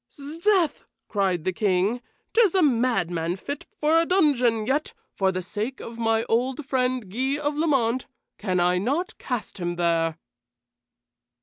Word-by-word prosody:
"'Sdeath!" 330 +5 0 0.2
cried 190 -5 0
the 185 - -1
King. 200 +4 +1 0.3
"'Tis 440 -6 +4
a 370 - +4
madman 180 - +1
fit 285 +9 -6
but - - -44
for 315 +2 +4
a - - 0
dungeon, 255 - +3
yet, 285 +6 -1 0.2
for 190 -1 +1
the 185 0 -3
sake 215 +8 -4
of 230 0 -8
my 225 0 +2
old 255 +6 0
friend, 255 -6 -1
Guy 265 +6 0
of 295 0 -2
Lamont, 260 -6 +1 0.3
can 185 -3 0
I 180 +1 +3
not 285 - -1
cast 245 -5 -4
him 175 -1 -2
there." 165 -2 +1
240 Hz, 150 wpm, -25 LUFS, 190-290 Hz, 0.3 s, Tis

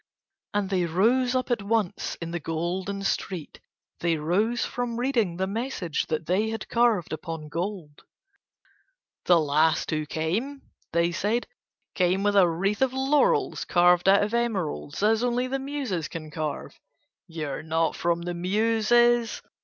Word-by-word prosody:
And 200 -1 0
they 180 -2 +1
rose 245 +9 +2
up 255 0 -1
at 235 - +1
once 210 -2 -1
in 165 0 -6
the 175 - -2
Golden 180 +5 -3
street, 185 -4 -3 0.4
they 170 -1 +1
rose 205 +10 0
from 245 -1 -3
reading 235 -9 0
the 190 - 0
message 200 - -3
that 155 0 -2
they 195 +6 +1
had 225 0 -5
carved 230 -9 +2
upon 160 -1 -6
gold. 170 -2 -5 1.2
"The 175 -2 +5
last 155 +2 +2
who 155 -1 -1
came," 215 - -2 0.3
they 170 +1 +2
said, 210 +7 0 0.5
"came 185 +1 +1
with 205 0 +2
a 185 -3 +6
wreath 195 +7 -1
of 265 -1 +2
laurels 270 +2 +2
carved 175 +1 +4
out 200 +1 +5
of 210 +2 -3
emeralds, 200 -9 -2
as 220 +2 +3
only 245 0 +1
the 270 +1 -2
Muses 265 - -3
can 155 -2 -8
carve. 150 -1 -5 0.5
You 160 -3 -5
are 135 - -4
not 160 +1 0
from 170 0 0
the 175 0 -3
Muses." 225 +5 +2
190 Hz, 155 wpm, -26 LUFS, 165-230 Hz, 1.2 s, a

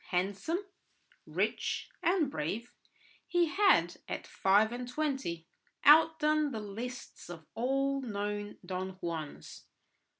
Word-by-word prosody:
Handsome, 200 - -1 0.6
rich, - - -1
and 335 -6 +2
brave, 210 - -3 0.5
he 350 -1 +3
had, 395 +6 +4
at - - -4
five 205 +3 +3
and 245 +1 -5
twenty, 265 - -2 0.4
outdone 305 0 +6
the 225 - -3
lists 225 +1 -7
of 165 -2 -9
all 275 +3 0
known 205 -3 -3
Don 185 +1 -4
Juans. 165 -4 -6
240 Hz, 105 wpm, -32 LUFS, 190-300 Hz, 0.6 s, outdone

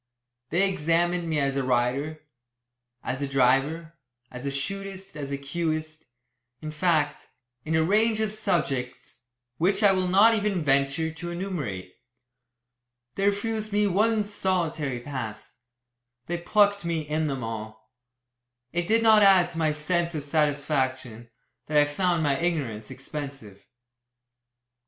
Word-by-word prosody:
They 185 +5 +3
examined 175 0 0
me 155 -2 +1
as 135 -1 0
a 140 - +1
rider, 130 +5 0 0.8
as 130 +1 -3
a 140 - -1
driver, 135 +5 +1 0.4
as 125 +2 -6
a - - -1
shootist, 195 +5 -5
as 145 -2 -5
a 140 - -1
cueist, 155 +2 -3 0.5
in 155 - -6
fact, 155 -2 0 0.4
in 160 +1 0
a 160 - +3
range 215 +5 +2
of 220 -1 0
subjects 135 - -2 0.4
which 195 +5 +2
I 200 - +7
will 185 -1 +1
not 200 +5 +6
even 205 -5 0
venture 140 +3 +1
to 175 +2 -7
enumerate. 150 - -4 1.2
They 195 0 0
refused 215 +1 -1
me 205 +1 +2
one 210 +3 +2
solitary 170 -9 -1
"pass." 120 -6 -7 0.7
They 170 +3 -3
"plucked" 205 +3 +3
me 170 -2 -1
in 155 +1 -1
them 135 -3 -3
all. 110 0 -7 0.8
It 175 0 -1
did 225 +1 +3
not 220 -1 +6
add 190 -3 +6
to 165 - -5
my 155 -1 +2
sense 170 +2 -1
of 145 -2 -4
satisfaction, 135 -6 -1 0.4
that 150 - +1
I 145 - +6
found 170 +2 0
my 140 -2 +1
ignorance 140 -12 -2
expensive. 135 -7 -8
160 Hz, 135 wpm, -26 LUFS, 140-185 Hz, 1.2 s, I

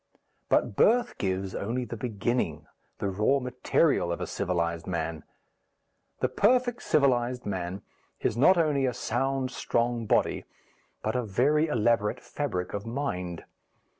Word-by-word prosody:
But - - +2
birth 240 - +3
gives 95 -1 -1
only 120 +5 -2
the 115 - -6
beginning, 120 +1 -2 0.3
the 100 - -2
raw 105 +8 +2
material, 125 - +1
of 85 - -2
a - - -2
civilized 85 -3 -2
man. 80 -3 -3 1.0
The - - +3
perfect 245 +2 +2
civilized 125 -4 +2
man 95 -1 -4 0.4
is - - 0
not 175 +10 +5
only 145 -5 +2
a 125 - -2
sound 135 +2 -1
strong 120 -1 -1
body - - +1 0.6
but 110 - -1
a 125 - +2
very 135 +9 +2
elaborate 115 -3 +1
fabric 110 -11 -4
of 100 - -3
mind. 90 - -3
120 Hz, 135 wpm, -28 LUFS, 95-135 Hz, 1.0 s, not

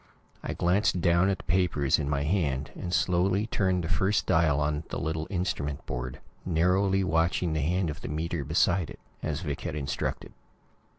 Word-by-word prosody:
I - - -3
glanced 90 +1 +2
down 85 +2 +3
at 95 - 0
the - - -12
papers 85 -6 +2
in 70 -2 -2
my 70 -1 0
hand, 75 -5 0
and 85 - -5
slowly 90 +4 +2
turned 95 -5 0
the - - -2
first 95 +5 +1
dial 80 -3 +3
on 75 +1 0
the - - -3
little 80 0 -2
instrument 85 -7 -2
board, 65 +1 -5 0.2
narrowly 95 +3 +2
watching 85 -1 +1
the 75 - 0
hand 85 +3 0
of 75 - -9
the - - -6
meter 80 +1 -2
beside 85 +4 +2
it, - - -10 0.2
as 75 0 -2
Vic 75 -5 -4
had - - -4
instructed. 70 -2 -3
85 Hz, 180 wpm, -28 LUFS, 75-90 Hz, 0.2 s, down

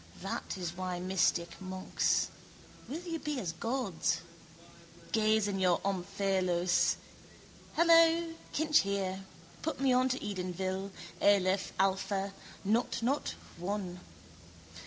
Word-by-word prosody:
That - - -3
is 175 -2 -4
why 180 -1 -3
mystic 180 -1 +1
monks. 185 0 0 0.6
Will 310 +6 -4
you 335 -2 -4
be 300 -3 -2
as 180 -8 -2
gods? 190 -6 -1 0.9
Gaze 215 -1 +3
in 195 -1 -1
your 180 -2 +3
omphalos. 185 -2 +1 0.8
Hello. 330 0 +5 0.2
Kinch 305 0 +4
here. 195 -1 -1 0.4
Put 320 - -2
me 270 -2 +3
on 255 +1 +4
to 260 - 0
Edenville. 190 0 -3 0.3
Aleph, 195 -1 +3
alpha: 195 +1 +1 0.3
nought, 230 +3 +1
nought, 275 +5 0 0.2
one. 180 0 -3
195 Hz, 110 wpm, -32 LUFS, 185-250 Hz, 0.9 s, Hello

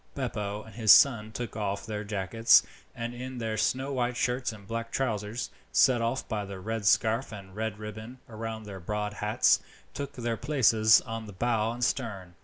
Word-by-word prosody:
Beppo 105 -6 -3
and 110 - -14
his 110 -2 +4
son 110 -5 +6
took 115 -1 -6
off 100 -2 -3
their 105 -1 -4
jackets, 105 +2 +4 0.3
and 115 +1 -4
in 130 +1 -7
their 110 -2 -2
snow 130 +5 0
white 125 -1 -1
shirts 125 -1 0
and 100 -3 -13
black 115 +1 -4
trousers, 110 -2 -2 0.2
set 125 -3 +4
off 115 +3 -1
by 105 -2 -2
the 100 -1 -7
red 110 +1 -3
scarf 115 +5 +2
and 100 -3 -9
a - - -17
red 110 0 -3
ribbon 110 +3 -8
round 110 -1 -6
their 100 -2 -8
broad 105 +3 -3
hats, 105 +1 +3 0.3
took 140 0 -5
their 120 -2 -3
places 115 -6 +4
on 115 -2 -6
the 100 - -9
bow 115 +2 0
and 120 +1 -4
stern. 100 -9 -2
110 Hz, 190 wpm, -28 LUFS, 105-120 Hz, 0.3 s, son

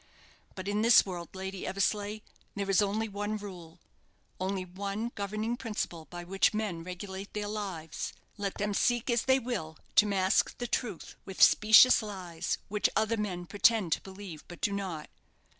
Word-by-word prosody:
But 185 0 -6
in 205 +1 0
this 230 +1 +7
world, 175 -3 -6
Lady 190 0 -5
Eversleigh, 205 +2 -1 0.3
there 200 -1 -2
is 195 - +5
only 210 +2 0
one 205 +1 -3
rule 180 -5 -10 0.6
only 190 0 -2
one 200 +5 -4
governing 215 +3 -2
principle 205 -9 -4
by 175 +1 -8
which 195 +4 +2
men 200 -6 -2
regulate 190 +2 -7
their 210 0 -2
lives 190 -7 -4 0.2
let 200 -2 -3
them 205 0 -1
seek 240 +4 +1
as 235 -1 +2
they 265 0 +5
will 225 -11 -4 0.2
to 210 - +7
mask 190 -1 +2
the 245 - -3
truth 235 -6 -3
with 190 - -9
specious 220 +4 +8
lies, 185 -6 -4
which 210 +1 +1
other 220 +1 +2
men 190 -5 -3
pretend 205 -1 +3
to - - +1
believe, 190 -5 -9
but 175 - -10
do 205 - +1
not. 185 -6 -4
200 Hz, 165 wpm, -30 LUFS, 185-215 Hz, 0.6 s, specious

